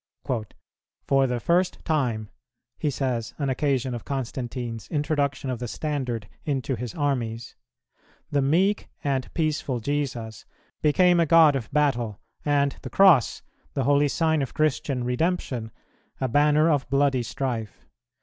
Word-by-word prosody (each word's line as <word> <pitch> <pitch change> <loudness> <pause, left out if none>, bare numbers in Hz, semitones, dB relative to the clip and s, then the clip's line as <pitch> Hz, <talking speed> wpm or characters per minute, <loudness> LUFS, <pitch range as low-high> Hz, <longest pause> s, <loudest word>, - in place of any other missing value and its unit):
"For 135 -1 +3
the 125 -1 -1
first 175 +7 +1
time," 120 -9 -1 0.5
he 150 - 0
says, 125 -4 -2
on 140 -3 -1
occasion 130 -2 0
of 120 - -5
Constantine's 120 -4 -4
introduction 145 -3 -1
of 125 - -4
the 120 - -4
standard 125 -6 -3 0.2
into 135 -2 -1
his 120 0 -6
armies, 120 -6 -2 0.8
"the 145 - +2
meek 180 +9 +2
and 135 -2 -1
peaceful 150 -5 -1
Jesus 125 -4 -3 0.4
became 175 +3 +4
a 165 - +3
God 160 -2 +6
of 115 -6 -4
battle, 120 -8 +1 0.2
and 140 -1 +1
the - - -7
Cross, 180 - +5 0.3
the 135 - +1
holy 145 +2 +4
sign 160 +1 +1
of 135 - -4
Christian 140 -3 0
Redemption, 125 -3 -1 0.5
a 130 - 0
banner 150 +4 +4
of 145 -6 +1
bloody 135 -2 +2
strife. 120 -3 -4
135 Hz, 135 wpm, -25 LUFS, 120-150 Hz, 0.8 s, God